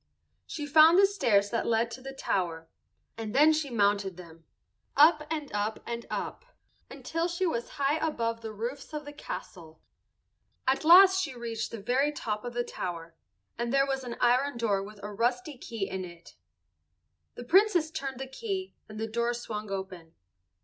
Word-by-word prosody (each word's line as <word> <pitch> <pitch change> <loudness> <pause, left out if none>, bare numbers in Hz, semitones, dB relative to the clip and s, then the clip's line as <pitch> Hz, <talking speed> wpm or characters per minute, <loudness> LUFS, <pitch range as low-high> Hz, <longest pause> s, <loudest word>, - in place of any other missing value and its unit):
She 295 - -5
found 315 +4 +7
the 395 - +7
stairs 215 - +2
that 230 - -1
led 230 0 +1
to 260 - -8
the 270 +1 -7
tower, 170 -10 -2 0.5
and 220 0 -5
then 305 +3 +6
she 305 -2 -1
mounted 200 -4 +1
them, 165 -2 -13 0.5
up 300 0 +6
and 305 -6 -4
up 210 +1 -1
and 235 0 -5
up, - - -4 0.5
until 330 +1 -3
she 350 +2 -1
was 235 -9 -2
high 285 +2 +2
above 230 -8 -2
the 220 -1 -6
roofs 240 +8 -6
of 300 -1 -5
the 290 - -8
castle. 165 - -8 0.9
At 265 +3 +1
last 375 +3 +8
she 295 -8 -4
reached 230 -2 -4
the 230 - -7
very 270 +5 +2
top 215 -7 -4
of 245 -1 -6
the 240 - 0
tower, 170 -6 -6 0.5
and 235 0 -1
there 275 0 +4
was 270 -1 -2
an 240 -2 -6
iron 250 +2 +2
door 210 -4 +1
with 205 +1 -10
a 210 0 -6
rusty 245 +6 -1
key 225 -5 -5
in 190 0 -4
it. 175 -1 -12 1.0
The - - -7
Princess 350 - +3
turned 270 -4 -5
the 270 - -4
key 380 - -5 0.2
and 215 0 -8
the 220 - -1
door 235 +2 -1
swung 215 -3 -6
open. 190 -4 -6
240 Hz, 175 wpm, -29 LUFS, 210-295 Hz, 1.0 s, last